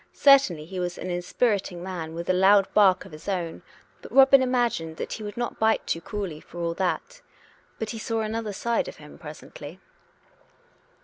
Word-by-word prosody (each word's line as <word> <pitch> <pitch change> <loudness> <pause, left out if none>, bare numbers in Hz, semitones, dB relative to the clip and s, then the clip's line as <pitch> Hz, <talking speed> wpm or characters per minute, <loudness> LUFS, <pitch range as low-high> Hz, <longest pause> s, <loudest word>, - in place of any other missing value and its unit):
Certainly 270 - +5
he 185 +2 -6
was 175 -1 -3
an 180 - -5
inspiriting 180 0 -1
man 170 -4 -5
with 170 +1 -5
a 185 - +3
loud 195 +2 +5
bark 190 -3 +4
of - - -13
his 155 +6 -8
own; 175 -4 -3 0.4
but - - -11
Robin 270 0 +7
imagined 240 -11 0
that - - -4
he - - -6
would 205 0 -7
not 240 0 -3
bite 220 0 +2
too 165 - -2
cruelly 185 -4 -5
for - - -14
all 170 -1 -1
that. 190 - -3 0.6
But 220 - -4
he 225 - -6
saw 225 0 -2
another 220 0 -3
side 235 +3 -1
of - - -8
him 150 -1 -14
presently. 150 +1 -10
190 Hz, 185 wpm, -25 LUFS, 170-220 Hz, 0.6 s, Robin